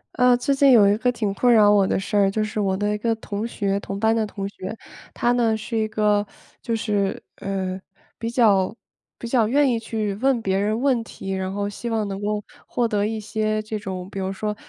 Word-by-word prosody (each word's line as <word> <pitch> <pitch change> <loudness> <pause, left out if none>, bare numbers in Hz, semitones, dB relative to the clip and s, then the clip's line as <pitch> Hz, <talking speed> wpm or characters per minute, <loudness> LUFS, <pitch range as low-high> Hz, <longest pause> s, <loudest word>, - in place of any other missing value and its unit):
呃， 250 -2 +5
最 245 +3 0
近 275 0 +4
有 215 -5 +7
一 200 - +4
个 250 +2 +1
挺 215 -5 -2
困 245 +5 +3
扰 210 -3 +6
我 200 -2 +4
的 - - 0
事 205 +2 -4
儿。 200 -1 +4
就 215 +2 -1
是 215 0 -3
我 190 -2 +1
的 205 +1 0
一 - - -1
个 225 +1 0
同 215 0 -4
学， 200 -4 -1
同 195 0 -6
班 220 +1 +3
的 220 -1 0
同 195 -1 -5
学。 200 +2 -7 0.3
她 240 - +1
呢 230 -3 +2
是 230 +2 -6
一 220 -1 +1
个， 210 -1 +1 0.4
就 230 -3 -2
是， 205 -3 -1
呃， 190 -1 -3 0.4
比 230 - -3
较 210 -5 +3 0.4
比 235 - -6
较 230 -3 +2
愿 280 +5 +3
意 230 - 0
去 220 -2 -3
问 265 -2 +3
别 190 0 0
人 215 +3 0
问 255 -3 +2
题， 195 -3 -7
然 190 0 -2
后 200 +1 -2
希 205 +4 -5
望 220 -2 -1
能 195 0 -5
够 210 0 -1 0.2
获 240 - 0
得 210 -2 0
一 220 0 -3
些 215 0 -1
这 215 0 -4
种 190 -3 -6
比 195 - -5
如 190 0 -2
说， 210 +2 -3
215 Hz, 250 characters per minute, -23 LUFS, 200-230 Hz, 0.4 s, 有